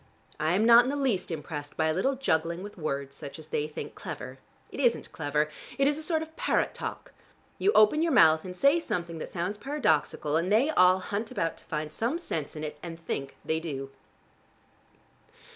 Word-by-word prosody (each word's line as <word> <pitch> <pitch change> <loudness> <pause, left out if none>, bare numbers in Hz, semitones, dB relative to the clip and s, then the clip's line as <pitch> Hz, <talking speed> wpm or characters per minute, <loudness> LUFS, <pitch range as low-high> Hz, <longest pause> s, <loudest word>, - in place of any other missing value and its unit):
I 155 +2 +1
am 205 +4 +3
not 235 +1 +9
in 250 - -2
the 285 - -1
least 255 -10 0
impressed 150 -2 -6
by 160 - +2
a 160 - +2
little 265 +11 +1
juggling 170 -8 0
with 205 - -8
words 140 -4 -4
such 140 - -8
as 155 -1 -10
they 150 -1 -1
think 155 - -7
clever. - - -7 0.3
It - - -7
isn't 245 -4 +1
clever: 150 0 0 0.3
it 275 0 +3
is 295 +1 +1
a - - -5
sort 320 -1 0
of 320 0 -13
parrot - - +1
talk. - - -6 0.5
You 410 - +4
open 215 +9 +5
your 335 0 +2
mouth 160 - +6
and 180 -1 -7
say 280 - +4
something 170 - -3
that - - -6
sounds 185 +4 -3
paradoxical 205 - 0
and 175 +4 -1
they 250 +9 +4
all 185 -8 +5
hunt 200 +4 -3
about 165 0 -1
to - - -11
find 150 0 -4
some 240 - -1
sense 160 - -4
in 155 - -5
it, 150 -1 -5
and 165 -1 -7
think 140 -4 -5
they 160 0 0
do." 135 -4 -5
175 Hz, 205 wpm, -28 LUFS, 155-250 Hz, 0.5 s, not